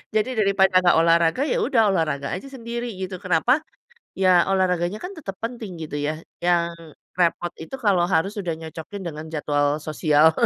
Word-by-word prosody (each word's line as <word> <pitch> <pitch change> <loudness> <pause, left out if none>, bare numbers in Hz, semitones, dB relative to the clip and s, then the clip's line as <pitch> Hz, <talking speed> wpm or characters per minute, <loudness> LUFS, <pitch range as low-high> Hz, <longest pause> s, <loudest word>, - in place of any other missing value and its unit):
Jadi 215 +4 +2
daripada 190 -2 +4
enggak 175 -1 +4
olahraga, 165 +5 +3
ya - - +2
udah 260 - +2
olahraga 150 -6 -1
aja 185 +9 -5
sendiri 240 -2 -5
gitu. 185 -1 -5
Kenapa? 200 - +2 0.6
Ya 185 -2 +4
olahraganya 185 0 +1
kan 360 - -5
tetap 195 -11 -6
penting 230 -5 -5
gitu 145 -1 -5
ya, 155 +2 -3 0.2
yang 170 -1 +2 0.5
repot 175 0 +1
itu 160 +11 -7
kalau 200 -9 +2
harus 190 +2 +1
udah 175 -4 -2
nyocokin 160 +4 -8
dengan 155 -2 -6
jadwal 145 -1 +1 0.2
sosial 155 0 +4
180 Hz, 160 wpm, -23 LUFS, 160-200 Hz, 0.6 s, daripada